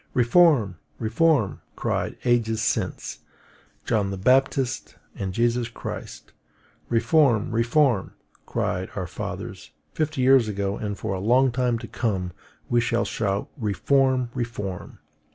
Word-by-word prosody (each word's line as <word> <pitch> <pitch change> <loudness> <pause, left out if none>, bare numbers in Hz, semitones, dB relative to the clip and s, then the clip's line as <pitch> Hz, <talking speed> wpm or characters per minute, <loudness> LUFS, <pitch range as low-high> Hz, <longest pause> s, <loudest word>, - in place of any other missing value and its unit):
Reform, 120 - +4 0.2
reform! 115 - +1
cried, - - -2
ages 115 -2 +2
since, 110 - -2 0.7
John 105 -4 +1
the 100 - -4
Baptist 130 +4 +1 0.2
and 95 -2 -4
Jesus 120 +3 +1
Christ. 115 - -8 0.6
Reform, 120 -1 +3
reform! 120 -1 +2 0.3
cried - - -2
our - - -2
fathers, - - -6 0.2
fifty 155 -3 -1
years 130 -3 +5
ago; 100 -1 -2
and 105 -1 -4
for 110 -3 -3
a 95 - -3
long 125 +6 +3
time 125 -1 +1
to 115 0 -8
come 95 -7 -2 0.4
we 120 0 +2
shall 120 0 0
shout, 100 -2 -2
Reform, 130 +3 +1
reform! 110 -7 -5
115 Hz, 120 wpm, -24 LUFS, 105-130 Hz, 0.7 s, years